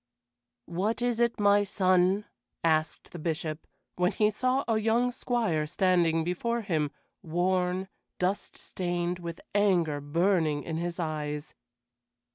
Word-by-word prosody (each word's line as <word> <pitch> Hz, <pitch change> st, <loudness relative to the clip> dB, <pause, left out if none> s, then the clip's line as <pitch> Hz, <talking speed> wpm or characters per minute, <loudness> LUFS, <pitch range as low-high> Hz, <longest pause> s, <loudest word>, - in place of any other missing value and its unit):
"What 190 Hz, +7 st, -1 dB
is 240 Hz, -1 st, 0 dB
it, 235 Hz, -1 st, +1 dB
my 205 Hz, 0 st, +5 dB
son?" 190 Hz, 0 st, +2 dB, 0.4 s
asked 155 Hz, -1 st, 0 dB
the 175 Hz, -, -8 dB
Bishop, 155 Hz, -1 st, -3 dB, 0.3 s
when 180 Hz, 0 st, +2 dB
he 210 Hz, 0 st, +2 dB
saw 255 Hz, +5 st, +1 dB
a 225 Hz, -2 st, +2 dB
young 230 Hz, +3 st, +2 dB
squire 230 Hz, -11 st, 0 dB
standing 170 Hz, -2 st, +2 dB
before 235 Hz, +8 st, -1 dB
him, 160 Hz, -8 st, 0 dB, 0.3 s
worn, 180 Hz, +2 st, 0 dB, 0.3 s
dust 185 Hz, +3 st, -2 dB
stained, 175 Hz, -1 st, -2 dB
with 170 Hz, -1 st, -6 dB
anger 175 Hz, -8 st, +2 dB
burning 160 Hz, 0 st, +1 dB
in 160 Hz, -1 st, -3 dB
his 170 Hz, +1 st, -3 dB
eyes. 150 Hz, -2 st, -3 dB
180 Hz, 125 wpm, -29 LUFS, 165-205 Hz, 0.4 s, my